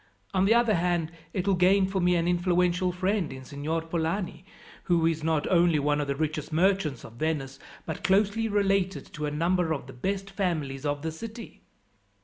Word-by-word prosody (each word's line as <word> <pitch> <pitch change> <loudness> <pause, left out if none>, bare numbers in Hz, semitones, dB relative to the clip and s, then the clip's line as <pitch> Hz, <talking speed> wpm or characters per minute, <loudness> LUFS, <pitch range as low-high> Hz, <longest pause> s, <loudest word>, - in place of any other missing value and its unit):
"On 190 0 +3
the 215 - +5
other 235 -2 +4
hand, 175 -2 0 0.2
it 185 0 -2
will 195 - +4
gain 190 +2 +4
for 190 0 -2
me 180 0 +3
an 170 0 +1
influential 180 +1 +2
friend 185 -1 -1
in 130 0 -8
Signor 150 +4 -3
Polani, 165 +1 -2 0.4
who 170 -3 +2
is 160 -1 0
not 160 -2 +1
only 170 -3 +4
one 145 +1 +1
of 145 - -3
the 140 - -1
richest 155 +1 -2
merchants 170 -5 +1
of 115 - -11
Venice, 145 -4 -2 0.3
but - - -5
closely 205 +3 +2
related 195 -2 +1
to 150 -1 -3
a - - 0
number 170 +3 +1
of 140 -5 -5
the 135 - -11
best 195 +8 -3
families 155 -8 -2
of 145 0 -2
the 160 - -2
city." 225 +7 -9
175 Hz, 190 wpm, -27 LUFS, 155-190 Hz, 0.4 s, the